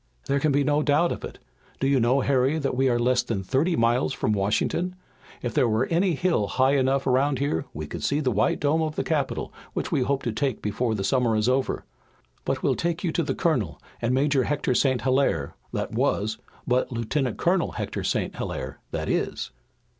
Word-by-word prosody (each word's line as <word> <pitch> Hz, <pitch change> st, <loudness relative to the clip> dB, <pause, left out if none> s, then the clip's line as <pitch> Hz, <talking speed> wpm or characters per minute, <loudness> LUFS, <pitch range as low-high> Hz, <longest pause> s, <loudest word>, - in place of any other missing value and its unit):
"There 140 Hz, 0 st, +1 dB
can 150 Hz, +1 st, +2 dB
be 140 Hz, +1 st, +3 dB
no 150 Hz, +1 st, +2 dB
doubt 150 Hz, +4 st, +3 dB
of -, -, -5 dB
it. -, -, -7 dB, 0.4 s
Do -, -, 0 dB
you 135 Hz, -1 st, +3 dB
know, 125 Hz, +4 st, +3 dB
Harry, 135 Hz, +3 st, +2 dB
that 140 Hz, -3 st, -1 dB
we 130 Hz, +1 st, +3 dB
are 120 Hz, -, +2 dB
less 125 Hz, +1 st, +2 dB
than 100 Hz, -4 st, -3 dB
thirty 145 Hz, -, +1 dB
miles 120 Hz, +3 st, +2 dB
from 110 Hz, -, 0 dB
Washington! 110 Hz, -, 0 dB, 0.5 s
If 120 Hz, -, -2 dB
there 120 Hz, -, +3 dB
were 110 Hz, +4 st, +2 dB
any 175 Hz, +1 st, +2 dB
hill 170 Hz, -, +1 dB
high 130 Hz, +4 st, +2 dB
enough 135 Hz, 0 st, +2 dB
around 135 Hz, +2 st, +2 dB
here 135 Hz, -, -1 dB
we 75 Hz, +1 st, -5 dB
could -, -, -7 dB
see 145 Hz, -, +1 dB
the 135 Hz, -4 st, +1 dB
white 105 Hz, +1 st, +1 dB
dome 150 Hz, +2 st, +2 dB
of 155 Hz, -1 st, -2 dB
the -, -, -1 dB
Capitol 145 Hz, -4 st, -2 dB, 0.2 s
which -, -, -3 dB
we -, -, +2 dB
hope 135 Hz, +2 st, 0 dB
to 120 Hz, -, -1 dB
take 130 Hz, +2 st, -1 dB
before 110 Hz, +2 st, -1 dB
the 100 Hz, -, -2 dB
summer 120 Hz, +2 st, +2 dB
is 110 Hz, +1 st, +1 dB
over. 130 Hz, +1 st, 0 dB, 0.6 s
But -, -, -1 dB
we'll -, -, +3 dB
take 170 Hz, +1 st, -2 dB
you 175 Hz, -, 0 dB
to 170 Hz, -, 0 dB
the 155 Hz, -, -2 dB
Colonel 130 Hz, -, 0 dB, 0.2 s
and 120 Hz, +1 st, +1 dB
Major 135 Hz, 0 st, +2 dB
Hector 145 Hz, -3 st, 0 dB
St. 130 Hz, -1 st, +2 dB
Hilaire, 130 Hz, -, +1 dB, 0.2 s
that -, -, -3 dB
was, 110 Hz, +2 st, 0 dB, 0.3 s
but 125 Hz, +1 st, +1 dB
Lieutenant 125 Hz, +2 st, -1 dB
Colonel 175 Hz, 0 st, +1 dB
Hector -, -, -4 dB
St. -, -, -1 dB
Hilaire -, -, -5 dB
that -, -, -3 dB
is." -, -, -1 dB
130 Hz, 210 wpm, -25 LUFS, 120-145 Hz, 0.6 s, be